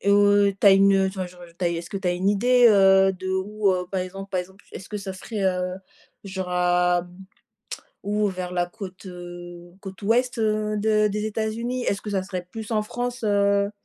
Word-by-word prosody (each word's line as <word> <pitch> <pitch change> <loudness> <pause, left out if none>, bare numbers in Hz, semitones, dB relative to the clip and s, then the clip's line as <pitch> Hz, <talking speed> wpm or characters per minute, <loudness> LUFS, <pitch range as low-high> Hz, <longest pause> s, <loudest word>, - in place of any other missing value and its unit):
Heu, 205 0 +4
tu - - +3
as - - +10
une, 195 +1 +5
heu, 195 0 +3
enfin 190 -1 -4
genre, 180 0 -14
heu 170 -1 -14
tu 185 - -2
as, - - +3
est-ce 170 0 -4
que 205 - -4
tu 190 -2 -2
as - - +2
une 180 +2 0
idée, 245 +5 +4
heu, 195 -2 +5
d'où 190 +2 -1
heu, 180 -1 -2
par 190 - -1
exemple, 195 +2 -6
par 185 - 0
exemple, 190 +2 -13
est-ce 195 - -9
que 210 - -4
ça 195 -1 -6
serait, 200 +2 -5
heu, 180 -1 0 0.5
genre 190 -2 -5
à, 180 0 +2 1.0
ou 210 +1 0
vers 185 -2 -4
la 175 0 +1
côte, 190 -1 -10
heu, 175 -1 -10
côte 195 +1 -9
ouest 240 +3 +1
de 215 0 +1
des 210 +1 -3
États-Unis? 230 +3 -2
Est-ce 200 - -1
que 210 - -6
ça 190 -2 0
serait 185 -2 -5
plus 220 0 -7
en 215 -1 +2
France, 245 +2 -4
heu? 200 -1 +2
195 Hz, 210 wpm, -24 LUFS, 180-210 Hz, 1.0 s, as